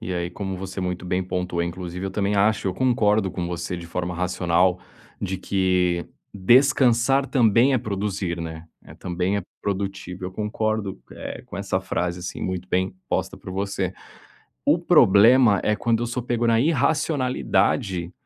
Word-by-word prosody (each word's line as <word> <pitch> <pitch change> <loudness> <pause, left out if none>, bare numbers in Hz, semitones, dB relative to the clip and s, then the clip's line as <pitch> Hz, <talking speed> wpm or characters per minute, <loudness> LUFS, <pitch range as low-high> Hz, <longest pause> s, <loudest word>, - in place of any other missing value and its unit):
E 95 - -4
aí, 85 0 -2
como 95 0 -5
você 95 0 -6
muito 90 0 -3
bem 90 +1 0
pontuou, 90 -1 -2
inclusive, 90 +2 -5
eu - - -4
também 100 +1 0
acho 105 0 +2
eu 90 - -3
concordo 110 -6 +2
com 90 -1 -4
você 90 +1 -4
de 85 -1 -8
forma 90 +1 -3
racional, 90 0 +1 0.4
de 95 -1 -2
que 90 -2 0 0.3
descansar 130 +4 +4
também 120 0 +4
é 130 - +3
produzir, 95 -4 -3
né. 80 0 -7 0.2
É - - -14
também 90 +3 -2
é 100 - -2 0.2
produtivo, 95 -2 -4
eu 95 - -5
concordo, 105 -1 -2
eh, - - -7
com - - -8
essa 100 -1 -1
frase 90 -1 -2
assim 90 - -6
muito 90 0 -3
bem 95 +1 0
posta - - -2
por - - -10
você. 95 -1 -2 0.7
O - - +4
problema, 105 +1 +5
é 105 - +2
quando 115 +1 0
eu - - -1
sou 120 +1 -3
pego 120 -1 -1
na 115 0 +3
irracionalidade, 125 - +1
95 Hz, 165 wpm, -23 LUFS, 90-110 Hz, 0.7 s, problema